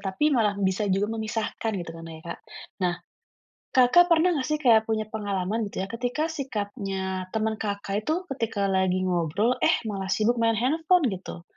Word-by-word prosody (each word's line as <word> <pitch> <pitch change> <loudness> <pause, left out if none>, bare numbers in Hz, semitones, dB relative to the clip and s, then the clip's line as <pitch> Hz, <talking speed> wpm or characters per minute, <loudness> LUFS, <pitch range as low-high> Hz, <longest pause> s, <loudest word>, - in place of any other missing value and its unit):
tapi 200 +10 0
malah 210 -5 +2
bisa 200 +1 0
juga 200 +3 +1
memisahkan 220 0 -2
gitu 175 -2 -5
kan 165 0 -10
ya, 160 -1 -9
Kak. 170 - -6 0.4
Nah, 180 -1 +1 0.8
Kakak 260 +8 +6
pernah 340 +1 +4
nggak 260 - -2
sih 305 - +1
kayak 235 -7 +4
punya 220 -1 0
pengalaman 205 0 -2
gitu 190 - -4
ya, - - -4
ketika 250 +7 -2
sikapnya 200 -8 -4
temen 220 0 0
Kakak 200 0 -3
itu 335 +4 0
ketika 225 -6 -1
lagi 185 -1 +1
ngobrol, 185 +6 +1
eh, 320 - +4
malah 195 -3 -4
sibuk 220 +5 +1
main 230 0 +3
handphone, 320 - +2
gitu? 180 -2 -7
215 Hz, 170 wpm, -26 LUFS, 190-245 Hz, 0.8 s, Kakak